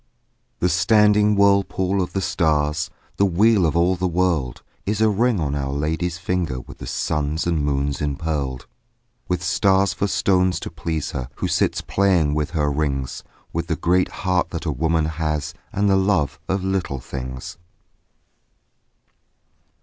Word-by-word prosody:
The 90 - +3
standing 105 +4 +4
whirlpool 100 -1 +2
of 90 - -3
the 95 - -1
stars, 75 -2 +1 0.3
The 100 - +4
wheel 100 0 +4
of 80 - 0
all 90 +2 +3
the 90 +1 -1
world, 85 -8 0 0.2
Is 105 +1 -1
a 110 -1 +4
ring 115 0 +2
on 75 -3 -1
Our 70 -1 -2
Lady's 80 +4 -1
finger 90 -7 -2
With - - -12
the - - -7
suns 75 +1 -1
and 85 -4 0
moons 70 -1 -1
empearled 70 -3 -2 0.6
With 90 -1 -1
stars 95 +1 +2
for 100 - -1
stones 95 -2 +2
to - - -6
please 80 -1 -3
her 65 -1 -4
Who - - -2
sits - - +1
playing 90 -7 +2
with 75 -1 -1
her 75 -3 0
rings 70 -3 -2 0.3
With 85 +1 -2
the 80 - 0
great 90 +3 +2 0.2
heart 90 -1 +2
that - - -5
a - - 0
woman 80 0 +1
has 75 -2 -2 0.2
And 100 +1 +1
the 95 -1 +4
love 95 -8 +1
of 95 0 0
little 95 -8 -1
things. 65 +3 -7
85 Hz, 155 wpm, -22 LUFS, 75-95 Hz, 0.6 s, standing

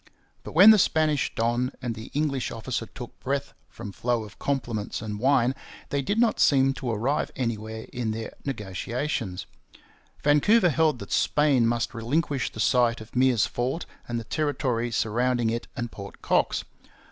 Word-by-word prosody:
But - - -9
when 195 +7 +9
the 215 - +6
Spanish 155 -5 +2
don 120 +2 0
and 125 -2 -3
the 110 +1 -9
English 140 -4 0
officer 115 0 -4
took 120 +4 -10
breath 140 +1 -2 0.2
from 100 - -8
flow 120 +2 -1
of 105 -2 -13
compliments 120 -7 -2
and 105 -1 -5
wine, 130 0 +3 0.4
they 140 - 0
did 205 +11 -1
not 230 -1 +3
seem 135 -1 +4
to 130 -2 -5
arrive 120 +6 0
anywhere 110 -2 -3
in 120 -2 -2
their 110 +1 -4
negotiations. 115 -2 -3 0.8
Vancouver 175 +8 +4
held 155 -1 +2
that 100 - -9
Spain 140 -6 +3
must 115 0 -1
relinquish 135 +4 -1
the - - -10
site 120 0 +3
of 110 0 -11
Meares's 125 -3 +3
fort 130 +7 -2 0.2
and 120 -1 -2
the - - -6
territory 125 -3 -1
surrounding 120 +1 +1
it 115 +1 -3
and 120 -1 -4
Port 100 -1 -10
Cox. - - +1
120 Hz, 160 wpm, -26 LUFS, 115-140 Hz, 0.8 s, when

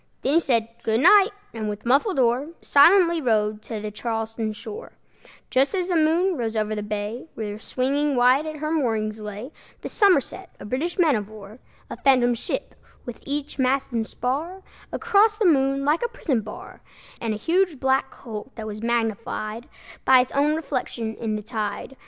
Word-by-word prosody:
Then 275 - +1
he 330 - +6
said, 235 -8 +1
"Good 225 +1 +1
night!" 400 +4 +7 0.2
and 220 -2 -3
with 210 +2 -6
muffled 280 - +2
oar 250 +2 +2
Silently 335 +3 +5
rowed 215 -4 +1
to 220 0 -6
the 210 0 -5
Charlestown 225 0 -3
shore, 420 - -9 0.6
Just 270 +8 +2
as 365 -1 -1
the 355 - +1
moon 335 +4 +2
rose 225 -2 -3
over 215 0 0
the 210 - -3
bay, 210 +6 -4
Where 210 -1 -5
swinging 280 +5 0
wide 255 +5 +4
at 310 - -5
her 305 +1 -3
moorings 220 -8 -1
lay 210 +6 -7 0.3
The - - -6
Somerset, 375 - +2 0.2
British 290 +10 -2
man 325 -7 +4
of 210 -1 -3
war; 215 +1 -12 0.3
A - - -7
phantom 250 -3 +4
ship, 235 - -4 0.3
with 240 -2 -8
each 285 0 -4
mast 265 +1 +1
and 230 -2 0
spar 310 +12 -3 0.3
Across 425 +1 +3
the 435 - +1
moon 275 -4 +3
like 300 +3 +2
a 475 - 0
prison 305 - -1
bar, 210 0 -10 0.4
And 225 -2 -1
a - - -4
huge 340 - +1
black 265 0 +1
hulk, 225 +1 -9
that 220 - -6
was 215 0 -6
magnified 225 -1 -2 0.3
By 260 -1 +6
its 250 - -4
own 290 +2 +2
reflection 250 -7 -3
in 220 -1 -3
the 210 - -5
tide. 215 +3 -4
255 Hz, 180 wpm, -24 LUFS, 220-305 Hz, 0.6 s, night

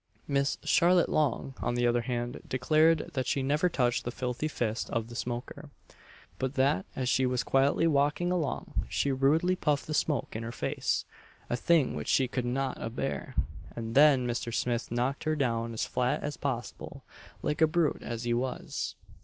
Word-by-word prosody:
Miss 140 -1 +1
Charlotte 175 +1 +4
Long, 140 -2 0
on 120 - -1
the 120 0 +1
other 120 0 +3
hand, 120 0 -3
declared 155 +5 +3
that 130 -3 -1
she 135 - 0
never 150 +6 +2
touched 120 -6 +1
the - - -3
filthy 125 +4 -2
fist 120 -6 -2
of 115 0 -2
the 120 - -9
smoker 120 +1 -5 0.7
but 130 +1 -2
that 130 -9 +2
as 130 - -2
she 130 +1 +3
was 125 -1 0
quietly 135 +5 +3
walking 150 +3 +2
along, 165 -6 -2
he 140 - +1
rudely 150 +7 +3
puffed 150 -5 0
the 155 - -4
smoke 150 -6 0
in 110 - -3
her 115 +1 -5
face - - -1 0.5
a - - +2
thing 155 +2 +3
which 75 - -5
she 130 - +3
could 125 0 -2
not 130 +2 -2
a 115 - -2
bear 75 - -4 0.4
and 115 -1 -4
then 140 -2 +6
Mr. 120 -1 -2
Smith 120 0 -1
knocked 125 +5 -1
her 155 0 +1
down 115 -5 0
as 115 - -2
flat 125 0 0
as 145 0 -3
possible 125 -5 -5 0.4
like 150 - -1
a 160 - +7
brute 165 -1 +1
as 115 0 -5
he 120 0 0
was. 125 +2 -3
130 Hz, 185 wpm, -29 LUFS, 120-150 Hz, 0.7 s, a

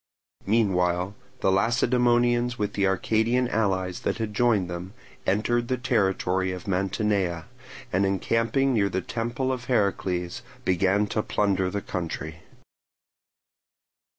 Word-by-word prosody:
Meanwhile 95 -4 +1 0.3
the 95 - +3
Lacedaemonians 120 +3 +2
with 105 -2 -2
the 100 -1 +1
Arcadian 110 +6 +1
allies 95 -5 0
that - - -2
had 110 -2 -3
joined 105 -4 +2
them, 90 +4 -7 0.3
entered 120 +4 +1
the 130 - 0
territory 95 -6 +1
of 90 0 -7
Mantinea, 95 -3 0 0.5
and 95 +2 +3
encamping 115 +7 +1
near 100 -4 +2
the 95 0 -1
temple 120 +6 -2
of 125 -1 -6
Heracles 100 -4 0 0.2
began 95 +3 +2
to 105 - -1
plunder 95 -3 0
the 100 +1 -3
country. 80 -2 -4
100 Hz, 120 wpm, -26 LUFS, 95-120 Hz, 0.5 s, the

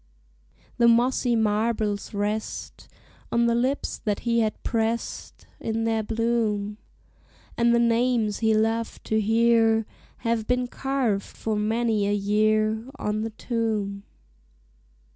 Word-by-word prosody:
The 235 - +6
mossy 240 +1 +3
marbles 215 -1 0
rest 210 +1 -4 0.4
On 235 0 +3
the 235 - +3
lips 255 +4 -1
that 205 -2 -1
he 235 -1 +1
had 220 -1 -1
pressed 230 0 -2
In 225 0 -2
their 225 -1 +1
bloom; 220 -2 -1 0.8
And 235 0 +3
the 235 - +4
names 235 -2 +2
he 220 -1 +3
loved 225 +1 -1
to 220 0 0
hear 225 0 +3 0.4
Have 230 -1 0
been 250 0 +1
carved 255 -6 -1 0.2
for 220 -1 -2
many 215 0 +1
a 205 - +1
year 215 +2 +1
On 210 +1 -2
the 225 - -2
tomb. 215 -3 -2
225 Hz, 125 wpm, -25 LUFS, 215-235 Hz, 0.8 s, The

